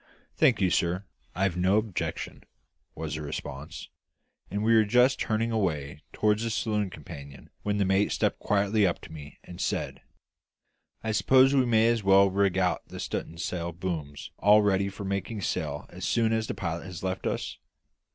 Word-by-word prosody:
"Thank 120 -5 +4
you, 95 -2 +3
sir; 90 +3 0 0.3
I've 95 -2 +1
no 95 +3 +3
objection," 110 -4 -3 0.5
was 80 -2 -4
the 80 - -4
response; 70 -1 -6 0.6
and 100 +2 -2
we 115 +1 +4
were 110 -1 +6
just 125 +5 +3
turning 115 +1 0
away 75 -10 -2
toward 105 0 +1
the 115 0 -2
saloon 105 -3 -1
companion 70 -4 -11
when 105 0 -1
the 100 - +2
mate 95 +2 +2
stepped - - 0
quietly 100 0 +2
up 85 - -1
to - - -12
me 75 -3 -10
and 90 - -9
said - - -2 1.0
"I 110 - -1
suppose 130 +4 +5
we 130 -3 +3
may 115 -1 +4
as 115 -1 +2
well 95 0 +5
rig 100 -1 +1
out 90 -1 0
the - - -9
stu'n'sail 85 +1 -4
booms 80 -5 -5
all 105 +1 +6
ready 100 -1 +2
for 100 +1 -8
making 100 +2 -3
sail - - -2
as 90 +1 -10
soon 115 +3 +2
as 110 0 0
the - - -4
pilot 85 +3 -4
has 90 -1 -8
left 95 0 -2
us? - - -3
100 Hz, 175 wpm, -28 LUFS, 85-110 Hz, 1.0 s, were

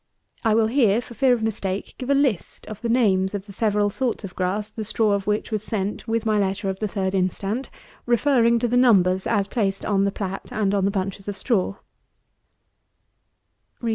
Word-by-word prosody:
I 220 -2 +3
will 225 0 +4
here, 225 -3 +3
for 245 - -9
fear 265 +2 +3
of 240 -3 +1
mistake, 200 -3 -3
give 255 - -5
a 280 - +4
list 270 - 0
of 215 -1 -8
the 235 - -2
names 200 -5 +2
of 200 -1 -5
the 205 - -11
several 205 0 +1
sorts 245 0 -2
of 185 -2 -8
grass, 200 +3 -2
the 220 - -5
straw 215 0 +1
of 200 -1 -1
which 210 +2 -1
was 215 -2 -1
sent 210 0 -3
with 225 0 -1
my 215 -1 +2
letter 195 0 -1
of 190 - -8
the 215 - -1
3d 190 -1 -2
instant, 195 +6 -1 0.4
referring 240 -1 +3
to 240 +1 0
the 245 +1 +1
numbers, 190 -7 +4
as 205 -4 +1
placed 200 -4 -1
on 200 -2 +2
the 200 - +1
plat 195 -1 -5
and 205 -2 0
on 195 -1 +2
the - - +3
bunches 195 0 -3
of 205 -1 -4
straw. 200 -2 0
210 Hz, 200 wpm, -23 LUFS, 195-230 Hz, 0.4 s, will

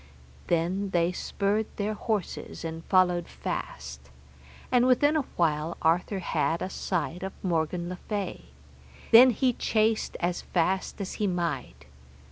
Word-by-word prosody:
Then 180 +4 0
they 175 -1 +2
spurred 205 +4 -1
their 210 +1 -1
horses, 210 -5 -3
and 165 0 -5
followed 180 -2 +3
fast, 65 +1 -6 0.6
and 250 0 +4
within 290 +4 +4
a 310 - +3 0.2
while 160 0 +1
Arthur 175 +5 +2
had 170 -2 0
a 185 - -4
sight 180 -2 -2
of 190 0 -4
Morgan 170 -1 0
le 180 0 -5
Fay; 205 -3 -3 0.7
then 245 +3 +10
he 250 +2 +2
chased 220 -1 +1
as 175 0 -1
fast 185 +4 -1
as 195 - -4
he 205 - +2
might. 175 -2 -3
185 Hz, 135 wpm, -28 LUFS, 170-210 Hz, 0.7 s, then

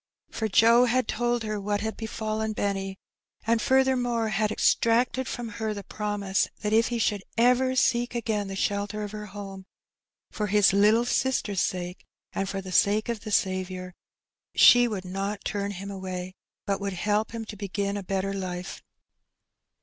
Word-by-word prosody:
For 220 - -2
Joe 230 +4 +5
had 250 -1 +1
told 240 -1 0
her 215 -1 -3
what 205 +1 -1
had 220 0 -3
befallen* 220 -1 -3
Benny, 195 -2 -2 0.5
and 225 0 +2
furthermore 250 -4 +2
had 215 +1 0
extracted 240 +4 +2
from 240 -1 -4
her 215 -1 -1
the 200 - -6
promise 205 -2 -1 0.2
that 210 0 0
if 225 +1 +4
he 240 - -2
should 210 -3 0 0.2
ever 250 +2 +3
seek 245 -1 +2
again 215 -3 -1
the 195 - -5
shelter 205 +2 -1
of 205 - -5
her 210 0 -7
home, 195 -1 -9 0.6
for 210 - -2
his 205 -1 +4
little 210 +4 +4
sister's 245 -6 0
sake 180 0 -3 0.3
and 195 0 -2
for 195 0 -3
the 185 -1 -8
sake 210 +5 +3
of 230 -2 -2
the 215 - -7
Saviour, 185 -1 -1 0.6
she 245 0 +7
would 200 -5 -4
not 195 +3 -4
turn 200 -1 -2
him 200 0 -6
away, 185 -1 -5 0.3
but 200 0 -1
would 200 -1 -2
help 210 +4 0
him 225 -1 -5
to 215 - -8
begin 200 0 -3
a 205 - -3
better 195 +1 -2
life. 185 -1 -5
210 Hz, 170 wpm, -27 LUFS, 195-230 Hz, 0.6 s, she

